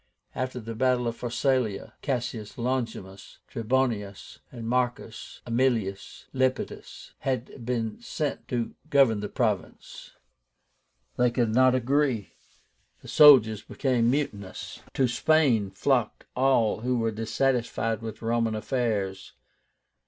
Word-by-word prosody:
After 130 0 -3
the 115 0 -6
battle 125 +1 +1
of 115 - -2
Pharsalia, 120 -3 -1
Cassius 120 -5 -3
Longinus, 115 -6 -4
Trebonius, 115 -4 -2
and 115 -3 -7
Marcus 125 -1 -2
Aemilius 115 -5 -1
Lepidus 130 -1 -2
had 130 -1 -3
been 115 - -3
sent 155 -11 -4
to 120 -2 -2 0.2
govern 135 -7 +4
the 105 0 -4
province. 110 -6 -3 1.0
They 125 - +4
could 120 -2 0
not 130 +1 +5
agree. 130 -4 0 0.7
The - - -11
soldiers 125 -9 +7
became 125 -4 0
mutinous. 105 -9 -3
To 130 - +3
Spain 125 -4 +2
flocked 120 +5 0
all 125 -5 +2
who 125 +2 0
were 115 -1 0
dissatisfied 115 0 -1
with 110 0 -7
Roman 115 -1 0
affairs. 105 -5 -2
120 Hz, 110 wpm, -27 LUFS, 110-130 Hz, 1.0 s, soldiers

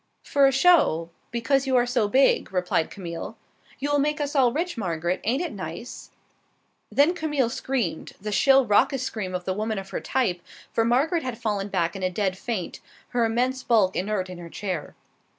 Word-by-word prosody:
"For 280 -1 +4
a - - +3
show, 270 - +4 0.2
because 270 +4 0
you 260 - +2
are 245 -1 +4
so 245 -3 +1
big," 265 0 +3
replied 180 -3 0
Camille. 170 -4 -7 0.4
"You 285 +2 -2
will 290 - +3
make 300 +2 0
us 290 0 -2
all 255 -4 +4
rich, 340 +6 -2
Margaret. 175 -4 -2
Ain't 260 +9 0
it 345 - -3
nice?" - - -7 0.8
Then 295 +5 +4
Camille 295 -8 0
screamed, 235 -14 -2
the 210 +2 -5
shrill 270 +5 +5
raucous 250 +5 +3
scream 195 -7 -4
of 180 -1 -4
the 185 - 0
women 215 +2 -2
of 195 0 -7
her - - -3
type, 210 -10 0 0.3
for 225 - +2
Margaret 280 +9 +2
had 255 -3 -4
fallen 210 -4 -2
back 175 -4 -1
in 195 - -6
a 185 - +1
dead 190 0 -1
faint, 195 -2 -4 0.3
her 240 -2 +1
immense 250 +3 0
bulk 210 -7 +3
inert 190 0 -1
in 180 -1 -9
her 170 -1 -9
chair. 185 -4 -5
230 Hz, 190 wpm, -25 LUFS, 185-270 Hz, 0.8 s, shrill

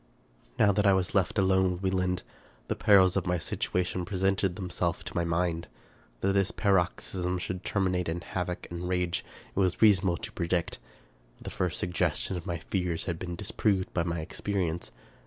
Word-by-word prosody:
Now 105 - +5
that 100 +1 +2
I 100 - +6
was 95 -1 0
left 95 +1 +1
alone 95 -1 +3
with 90 +2 -8
Wieland, 90 -1 0 0.5
the - - +1
perils 95 -3 +5
of 95 -3 0
my 90 0 +2
situation 90 +2 -1
presented 95 0 0
themselves 90 -3 -2
to 95 +2 -8
my 85 - +1
mind. 85 0 0 0.5
That 95 - +2
this 100 -1 +2
paroxysm 90 -2 0
should 90 +1 -4
terminate 90 -3 0
in 85 +1 -2
havoc 90 0 -4
and 85 +1 -4
rage 90 -1 0 0.3
it - - 0
was 95 -2 +2
rea 110 -2 +8
sonable 95 -3 0
to - - -5
predict. 85 0 -1 0.6
The - - -7
first 90 -1 -1
suggestion 90 +2 0
of 90 +2 -6
my 85 -2 -1
fears 90 0 -2
had 85 -1 -3
been 85 -1 -4
disproved 95 0 0
by 90 - +1
my 85 -1 -2
experience. 85 0 -2
90 Hz, 175 wpm, -29 LUFS, 85-95 Hz, 0.6 s, rea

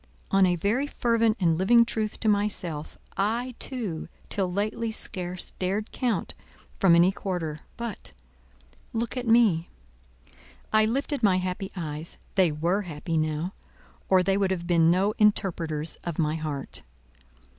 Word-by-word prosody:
On 195 -1 +5
a 180 - +2
very 215 - 0
fervent 230 -4 +1
and 165 -3 +2
living 235 +5 +6
truth 215 -2 -2
to 220 - 0
myself, 200 -7 0 0.2
I, 230 +6 0
too, 215 -12 -4 0.2
till 190 -3 -1
lately 215 +4 -1
scarce 180 -4 -3
dared 195 +4 -1
count, 245 -4 -1 0.5
from 180 -4 +6
any 175 +2 +5
quarter; 175 -6 -3 0.2
but——look 65 - -8
at 250 -2 -3
me." 220 -8 +4 1.0
I 215 0 +5
lifted 275 +5 0
my 195 -5 +4
happy 185 +1 -3
eyes: 155 -2 -4 0.2
they 185 -5 +4
were 170 +7 0
happy 165 -2 -4
now, 155 +3 -1 0.6
or 185 -1 +5
they 195 +1 +2
would 195 -1 +2
have 180 -2 -2
been 170 -2 +4
no 190 +4 +3
interpreters 165 -7 +1
of 170 -3 -4
my 155 -2 +1
heart. 150 -4 -4
185 Hz, 140 wpm, -27 LUFS, 165-215 Hz, 1.0 s, living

